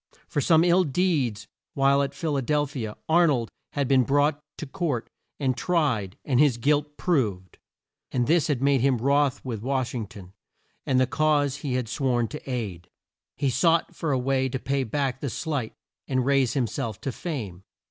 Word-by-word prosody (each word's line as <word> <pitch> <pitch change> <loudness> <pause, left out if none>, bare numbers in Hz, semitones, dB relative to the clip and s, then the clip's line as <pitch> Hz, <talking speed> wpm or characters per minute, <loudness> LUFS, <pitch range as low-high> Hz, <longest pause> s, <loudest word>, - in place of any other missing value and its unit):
For 145 - -1
some 160 +3 +4
ill 175 +1 +4
deeds 145 - 0 0.3
while 140 0 +4
at 140 - -2
Phil 160 -3 -2
a 135 - +1
del 145 +3 +1
phi 135 -5 -5
a 105 - -8
Ar 170 +2 +5
nold 120 -7 0 0.2
had 140 -2 0
been 135 -1 +4
brought 145 +3 +2 0.2
to - - -5
court 145 -6 -3 0.3
and 130 -3 +1
tried 125 - 0
and 130 -4 +2
his 140 -5 +4
guilt 150 +4 0
proved, 105 - -1 0.5
and 125 -2 +1
this 165 +3 +3
had 140 -4 -1
made 140 -2 +3
him 135 -1 +3
wroth 140 +2 +1
with 115 -5 -4
Wash 130 0 -1
ing 115 -4 -3
ton, 95 -2 -13 0.5
and 130 -1 +3
the 130 - +4
cause 145 0 +1
he 140 -2 -3
had 125 -2 -1
sworn 120 -1 0
to 150 -2 -8
aid. 105 -9 -4 0.5
He 140 -2 +1
sought 165 +5 +2
for 160 - -2
a 135 - +2
way 130 +1 0
to 130 - -2
pay 135 +1 -1
back 135 +2 -2
the 140 - -3
slight 140 -4 -3 0.3
and 130 -2 0
raise 135 -3 +2
him 130 -3 +2
self 115 -3 -4
to 135 - -2
fame. 115 - -5
135 Hz, 195 wpm, -26 LUFS, 120-150 Hz, 0.5 s, Ar